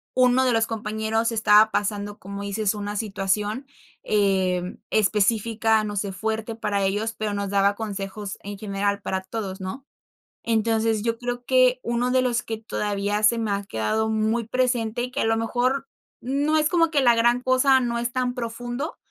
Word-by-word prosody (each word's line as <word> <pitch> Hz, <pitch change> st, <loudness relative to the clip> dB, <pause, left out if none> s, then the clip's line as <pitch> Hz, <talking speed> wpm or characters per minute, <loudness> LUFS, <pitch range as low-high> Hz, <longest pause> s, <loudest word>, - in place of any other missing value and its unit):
uno 255 Hz, 0 st, +4 dB
de 250 Hz, -, +2 dB
los 225 Hz, 0 st, +3 dB
compañeros 220 Hz, +1 st, -1 dB
estaba 215 Hz, -1 st, +5 dB
pasando, 205 Hz, 0 st, -2 dB
como 200 Hz, +1 st, -7 dB
dices, 200 Hz, +1 st, -1 dB
una 205 Hz, 0 st, -5 dB
situación, 205 Hz, +3 st, -1 dB, 0.4 s
em, 190 Hz, -3 st, +1 dB
específica, 220 Hz, +1 st, +2 dB
no 205 Hz, -1 st, -4 dB
sé, 200 Hz, -1 st, -2 dB
fuerte 220 Hz, +3 st, -3 dB
para 200 Hz, -3 st, -1 dB
ellos, 210 Hz, +4 st, -1 dB
pero 215 Hz, -1 st, -2 dB
nos 200 Hz, -1 st, -2 dB
daba 200 Hz, 0 st, +2 dB
consejos 200 Hz, -1 st, -5 dB
en 205 Hz, 0 st, -6 dB
general 200 Hz, 0 st, -2 dB
para 190 Hz, -1 st, -3 dB
todos, 195 Hz, -2 st, -5 dB
¿no? 200 Hz, +9 st, -6 dB, 0.6 s
Entonces, 225 Hz, -1 st, +1 dB
yo 230 Hz, 0 st, 0 dB
creo 245 Hz, 0 st, -4 dB
que 255 Hz, 0 st, +4 dB
uno 240 Hz, +1 st, 0 dB
de 255 Hz, 0 st, +3 dB
los 245 Hz, -2 st, 0 dB
que 225 Hz, -, -4 dB
todavía 205 Hz, -1 st, -2 dB
se 230 Hz, +2 st, +5 dB
me 220 Hz, -2 st, -1 dB
ha 200 Hz, 0 st, -1 dB
quedado 195 Hz, -, -1 dB
muy 220 Hz, +1 st, 0 dB
presente, 245 Hz, -1 st, 0 dB
que -, -, -4 dB
a -, -, +1 dB
lo 225 Hz, 0 st, +2 dB
mejor 255 Hz, +4 st, 0 dB, 0.3 s
no 285 Hz, +4 st, +1 dB
es 305 Hz, 0 st, +2 dB
como 335 Hz, -2 st, +3 dB
que 290 Hz, -3 st, +2 dB
la 240 Hz, -2 st, +5 dB
gran 240 Hz, +2 st, +3 dB
cosa, 260 Hz, +1 st, +4 dB
no 235 Hz, -1 st, -1 dB
es 240 Hz, 0 st, -2 dB
tan 255 Hz, -1 st, 0 dB
profundo, 245 Hz, +4 st, -5 dB
220 Hz, 175 wpm, -24 LUFS, 205-240 Hz, 0.6 s, estaba